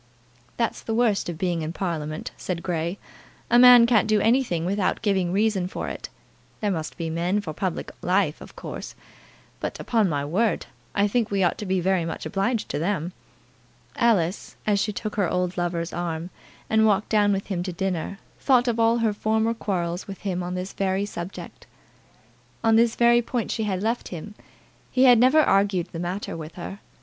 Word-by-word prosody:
"That's 230 -1 -1
the 225 - -3
worst 225 -6 +2
of 170 - -5
being 175 -1 -1
in 155 +1 -4
Parliament," 155 -5 -3
said 175 -2 -4
Grey. 170 +1 -2 0.5
"A 240 - +7
man 245 -1 +9
can't 235 -3 +3
do 215 -1 +3
anything 225 -7 +2
without 195 +3 0
giving 190 -4 +1
a - - -3
reason 200 -2 +1
for - - -5
it. - - -7 0.5
There 210 -2 0
must 160 -4 -4
be 165 -2 -3
men 175 +5 0
for 175 -7 -5
public 185 +2 -3
life, 180 -3 +1
of - - -12
course; - - -7 0.6
but, - - -4
upon 220 -5 +1
my 145 -2 -1
word, 190 +6 0 0.3
I 200 +1 +3
think 230 +1 0
we 195 -1 +1
ought 175 - +1
to 210 - -5
be 190 0 +1
very 185 0 +1
much 165 - -5
obliged 210 +3 -1
to - - -2
them." 175 0 -1 0.8
Alice, 200 -7 +1
as 205 -2 +2
she 210 - 0
took 215 +1 -5
her 195 -5 +2
old 180 0 -1
lover's 175 -1 -2
arm, 170 0 -3 0.4
and 220 0 +3
walked 210 0 +1
down 205 -2 +3
with 195 0 -1
him 185 -4 -2
to 185 +1 -3
dinner, 185 +1 -3 0.2
thought 255 -2 +3
of 235 -1 0
all 230 +1 +4
her 215 - +2
former 220 +2 +1
quarrels 180 -5 -3
with 195 -1 -8
him 185 -3 -2
on 180 +1 -4
this 185 +1 -4
very 195 0 0
subject. 180 -2 -8 1.0
On 225 0 +4
this 230 0 +4
very 240 0 +5
point 240 -1 -3
she 220 - -1
had 190 -2 -2
left 230 +2 -1
him. 180 +4 -7 0.6
He 255 - +2
had 245 -3 +7
never 260 +6 +6
argued 195 - +2
the 165 - -6
matter 180 +4 -4
with 160 -1 -8
her. 190 +3 -7
195 Hz, 195 wpm, -24 LUFS, 175-220 Hz, 1.0 s, man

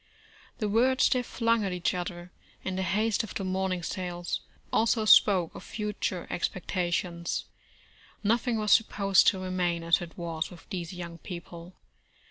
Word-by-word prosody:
The 215 - -1
words 250 +5 +3
they 255 - +2
flung 230 -2 +1
at 195 - -1
each 180 -1 0
other, 175 0 -5 0.3
in 190 - -3
the 190 - -1
haste 210 +5 +1
of 220 - -8
the - - -2
morning 185 -1 -1
sales, 175 -1 -3 0.3
also 225 0 +3
spoke 190 -5 +6
of - - -9
future 210 -4 -3
expectations. 175 -1 -2 0.8
Nothing 230 +2 +2
was 210 -1 0
supposed 195 -3 +4
to 195 - +5
remain 180 -2 -1
as 170 +1 +3
it 170 -1 -9
was 165 -2 -3
with 175 -2 -14
these 175 -3 -4
young 170 -2 -7
people. 170 0 -9
185 Hz, 150 wpm, -28 LUFS, 175-210 Hz, 0.8 s, spoke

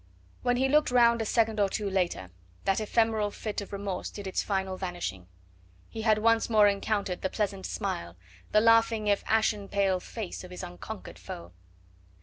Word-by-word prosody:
When 245 -1 +1
he 265 +1 +2
looked 300 +2 +3
round 235 -2 +4
a - - -1
second 225 -1 +1
or 200 -1 +3
two 205 +1 -2
later 180 - -1 0.3
that 195 +1 +2
ephemeral 220 -1 +1
fit 210 0 -4
of 200 - -9
remorse 200 -2 -4
did 205 - -8
its 190 - -1
final 190 -2 -1
vanishing; 175 - -5 0.6
he 225 - -6
had 215 -1 +4
once 230 +2 +3
more 215 -2 +6
encountered 200 -2 -1
the 190 - -1
pleasant 200 -2 -2
smile, 85 - -4 0.4
the 215 - +5
laughing 230 -1 +4
if 205 -1 +2
ashen 215 -2 +1
pale 195 -2 +1
face 205 0 -6
of 180 - -10
his 180 - -8
unconquered 90 0 -8
foe. 85 +1 -8
205 Hz, 175 wpm, -29 LUFS, 190-225 Hz, 0.6 s, more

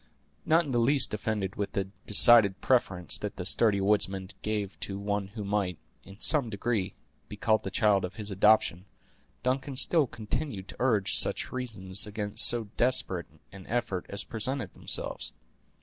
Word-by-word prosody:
Not 165 +1 +3
in 140 - -6
the 120 - +1
least 135 +2 +2
offended 105 0 -3
with 100 -1 -4
the 100 - -1 0.2
decided 105 -2 +6
preference 95 -9 +1
that - - -6
the - - -6
sturdy 105 -4 +3
woodsman 95 -1 0
gave 105 -2 -4
to 100 - -5
one 100 0 -3
who 105 +1 -8
might, 100 -4 -2 0.3
in 100 +1 -15
some 140 -4 +3
degree, 105 -1 -3 0.3
be 105 - -9
called 110 +1 +1
the - - -4
child 100 -1 +2
of 90 +1 -6
his 105 -2 -7
adoption, 100 -3 +2 0.6
Duncan 130 +1 -2
still 155 0 +2
continued 110 -2 -5
to - - -10
urge 110 -7 +3
such - - +1
reasons 105 -6 +1
against 105 -1 +3
so 115 -3 +2
desperate 115 -8 +1 0.2
an 95 -2 -13
effort 110 -6 -3
as 100 -1 -6
presented 115 -1 -4
themselves. - - -3
105 Hz, 165 wpm, -28 LUFS, 100-120 Hz, 0.6 s, decided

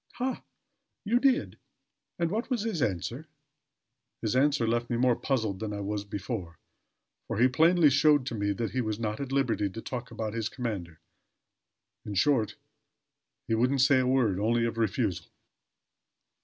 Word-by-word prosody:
"Ha! 255 +1 -2 0.6
You 235 +4 +3
did! 270 +1 +1 0.6
And 170 -1 0
what 225 +6 -2
was 240 -5 0
his 215 -9 -2
answer?" 115 - -2 1.0
"His 110 +2 0
answer 140 -2 +3
left 120 +1 0
me 120 - 0
more 125 0 +3
puzzled 110 -9 -1
than 110 -1 -4
I 100 - -4
was 100 0 -3
before; 100 -4 -5 0.7
for - - -3
he 120 +3 +5
plainly 160 +3 +4
showed 145 -1 +4
to 125 - -4
me 100 -2 0
that 115 +3 -3
he 130 - 0
was 110 -3 -2
not 110 -2 -2
at 140 -1 -5
liberty 125 -7 +1
to 105 - -8
talk 125 -1 -5
about 110 -1 -4
his 115 -2 -2
commander. 100 -11 -5 1.0
In 105 - -6
short, 115 0 +2 0.9
he - - 0
wouldn't 125 +4 +2
say 135 0 +5
a 130 - +1
word, 120 -8 +2
only 115 +3 +2
of 115 0 -3
refusal." 110 -3 -1
120 Hz, 165 wpm, -28 LUFS, 105-140 Hz, 1.0 s, he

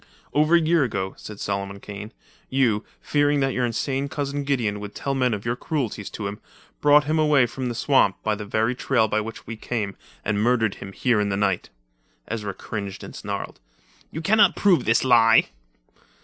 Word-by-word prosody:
"Over 155 +3 +4
a - - +6
year 165 -1 +3
ago," 100 -6 -2
said 105 -1 -10
Solomon 100 0 -3
Kane, 105 +2 -8 0.4
"you, 120 -5 +2 0.2
fearing 145 0 +2
that 135 -1 +1
your 125 -1 +1
insane 135 +4 -2
cousin 145 0 -3
Gideon 115 -7 0
would 105 0 -8
tell 140 - -2
men 130 -2 +1
of 105 -1 -4
your 120 +1 0
cruelties 120 -7 -3
to 105 - -6
him, 100 +1 -4 0.4
brought 150 0 +6
him 155 +2 0
away 150 -4 +4
from 125 +2 -4
the 120 - -4
swamp 120 -5 +3
by 110 - +1
the 105 0 -5
very 110 +4 0
trail 125 -3 +1
by 110 - 0
which 115 +1 -8
we 115 - -6
came, 105 -3 -3 0.3
and 105 0 0
murdered 115 -3 +2
him 95 - -7
here 120 +2 +1
in 105 -1 0
the 100 - -1
night." 95 -3 0 0.6
Ezra 105 -4 -4
cringed 100 -2 -6
and - - -9
snarled. - - -5 0.5
"You 160 - -5
can 205 +6 +2
not 200 -3 +6
prove 180 -10 +3
this 115 - +3
lie!" 115 -3 +5
115 Hz, 195 wpm, -24 LUFS, 105-140 Hz, 0.6 s, a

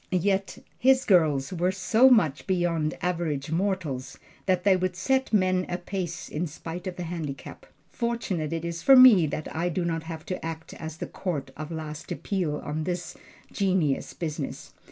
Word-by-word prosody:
Yet 195 +2 0 0.2
his 260 +1 +4
girls 155 -5 +3
were 180 +1 +1
so 220 +7 +4
much 165 - +3
beyond 170 -4 0
average 165 -5 -1
mortals 165 -8 -2 0.3
that 185 -2 +2
they 195 -2 +5
would 185 0 -1
set 265 +7 0
men 185 -3 +3
a 175 - -1
pace 180 -1 -5
in 170 +4 -3
spite 165 +4 -7
of 185 - -4
the 180 - -5
handicap. 160 -5 -6 0.2
Fortunate 230 - -2
it 165 0 -3
is 170 0 -4
for 270 - +7
me 240 -10 +8
that 155 +1 -5
I 170 +2 0
do 175 +1 -1
not 165 -1 -1
have 160 -1 -7
to 185 - -4
act 160 0 -6
as 160 -1 -7
the - - -4
court 145 -8 -4
of 155 0 -6
last 155 -1 -6
appeal 180 -7 -2
on 155 +1 -2
this 180 -1 -4 0.4
genius 185 -8 0
business. 155 -4 -5
175 Hz, 175 wpm, -27 LUFS, 155-190 Hz, 0.4 s, me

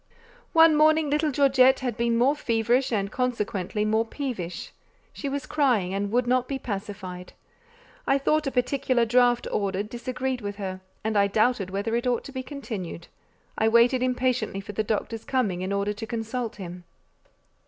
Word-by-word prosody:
One 325 -1 +7
morning 310 0 +4
little 300 +1 +2
Georgette 265 -2 +4
had 250 -4 -2
been 235 0 +1
more 265 +5 +3
feverish 240 0 +1
and 200 -2 -1
consequently 210 -5 -1
more 220 +1 +2
peevish; 230 - -5 0.4
she 280 - -4
was 280 0 -3
crying, 245 -11 +1
and 200 +1 -1
would 245 +2 +2
not 250 0 +1
be 275 - -2
pacified. 195 -5 -6 0.7
I 275 - +4
thought 305 +2 +1
a - - -1
particular 250 -1 +1
draught 245 +1 +3
ordered, 200 0 -1
disagreed 255 +1 -3
with 205 -1 -4
her, 190 -2 -5 0.2
and 220 0 -1
I 200 -1 +4
doubted 215 -1 +1
whether 200 +4 -2
it 240 +2 -1
ought 245 -2 +1
to - - -9
be 260 -1 -4
continued; 225 - -7 0.5
I 220 - +3
waited 235 +3 +4
impatiently 250 -5 0
for 200 - -7
the 215 +2 -1
doctor's 220 +1 -3
coming 210 -9 -1
in 185 +1 -3
order 200 +1 0
to 220 +2 -7
consult 230 0 -3
him. 180 -2 -8
235 Hz, 170 wpm, -26 LUFS, 205-260 Hz, 0.7 s, One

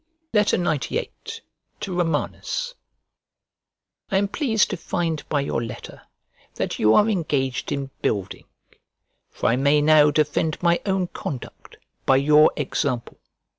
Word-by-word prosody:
XCVIII 175 - +1 0.7
To 185 - -4
ROMANUS 180 - -2 1.4
I 195 - +1
AM 200 0 +1
pleased 225 -5 +1
to - - -2
find 165 -2 -2
by 145 - +1
your 140 -4 -2
letter 115 - -8 0.5
that - - -3
you 110 +1 +5
are 210 - +5
engaged 145 - -1
in 140 -1 -3
building; 95 -3 -2 0.8
for - - -7
I 115 - +2
may 140 +2 +3
now 150 0 +6
defend 150 +1 0
my 170 0 +3
own 190 -1 +1
conduct 130 - -8 0.3
by 135 - +6
your 150 +3 +5
example. 125 -5 -2
150 Hz, 125 wpm, -23 LUFS, 140-180 Hz, 1.4 s, now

